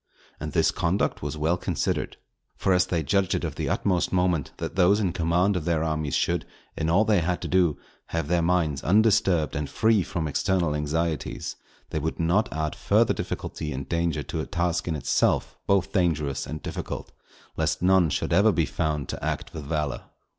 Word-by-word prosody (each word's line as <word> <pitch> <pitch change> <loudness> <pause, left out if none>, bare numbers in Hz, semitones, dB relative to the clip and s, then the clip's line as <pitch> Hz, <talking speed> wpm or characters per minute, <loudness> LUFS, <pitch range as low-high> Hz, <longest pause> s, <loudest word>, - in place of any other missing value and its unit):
And 75 0 -5
this 80 - +3
conduct 90 +1 0
was 75 +1 -4
well 80 +4 +1
considered. - - -2 0.4
For 95 - +2
as 90 0 +3
they 85 -3 0
judged 100 +4 +1
it - - -2
of - - -2
the - - -3
utmost 90 -3 +1
moment, 90 -6 +1
that - - -5
those 95 +2 +4
in 95 -5 0
command 90 +3 +2
of 85 -4 -2
their 85 -2 +1
armies 75 -3 -1
should, - - +1 0.3
in 80 0 -1
all 100 +6 +4
they 105 -3 +3
had 90 +1 -1
to - - -2
do, 90 -5 +2 0.3
have 80 -3 -2
their 85 +1 +2
minds 85 -5 +1
undisturbed 95 -5 +3
and 75 -2 -2
free 110 -2 +3
from 85 -3 -3
external 85 +1 +1
anxieties, 75 +1 -2 0.4
they 80 - -1
would 80 +2 -3
not 85 +6 +2
add 80 -1 -2
further - - +3
difficulty 75 -1 -4
and 65 +1 -5
danger 85 -3 0
to 80 +4 -4
a - - -5
task 90 -1 -1
in 80 - -1
itself 75 - +1
both 100 -2 +2
dangerous 75 -7 0
and 75 0 -6
difficult, - - -5 0.4
lest - - -1
none 95 -2 +4
should - - -1
ever 100 +5 +5
be 90 - +1
found 75 -3 -2
to - - -5
act - - -3
with 75 -3 -6
valour. 75 -5 -2
85 Hz, 190 wpm, -26 LUFS, 75-90 Hz, 0.4 s, ever